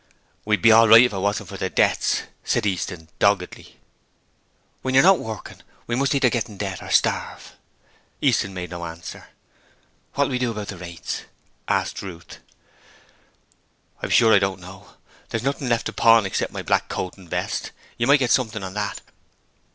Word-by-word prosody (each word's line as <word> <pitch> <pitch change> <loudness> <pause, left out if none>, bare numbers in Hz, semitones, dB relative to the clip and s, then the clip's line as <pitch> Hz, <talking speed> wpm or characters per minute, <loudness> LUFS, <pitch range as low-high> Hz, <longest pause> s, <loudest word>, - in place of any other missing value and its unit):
'We'd 105 -4 0
be 115 - +7
all 115 +1 +7
right 115 +2 +9
if 125 - +1
it - - -3
wasn't 100 +1 -2
for - - -7
the - - -2
debts,' - - +1 0.2
said - - 0
Easton, 90 -4 -3
doggedly. 100 -3 0 1.0
'When 130 0 -2
you're 135 - +7
not 190 0 +6
working, 110 -1 -8 0.2
we 120 - -4
must 135 +2 +1
either 130 -3 +3
get 120 0 -1
into 105 -1 -5
debt 95 -2 -5
or - - -9
starve.' - - 0 0.6
Easton 100 - +1
made 90 -1 -6
no 85 -1 -6
answer. 85 0 -8 0.9
'What'll 140 0 +1
we 125 - -1
do 125 -1 0
about 105 -3 -5
the 95 - -6
rates?' 85 -2 -6 0.4
asked - - -1
Ruth. 85 -4 -10 1.6
'I'm - - -3
sure 115 -2 +5
I 100 - +7
don't 95 -1 -1
know: 95 +2 -13 0.3
there's 115 0 -3
nothing 140 -1 -2
left 120 -1 +1
to - - -4
pawn 115 -2 +5
except 95 - -2
my - - -6
black - - 0
coat 90 - -4
and 95 -3 -16
vest. - - -3 0.3
You 120 - +1
might 140 +2 +7
get 125 -4 0
something 110 -5 +1
on 95 -1 -6
that.' 105 0 -3
105 Hz, 180 wpm, -23 LUFS, 95-120 Hz, 1.6 s, right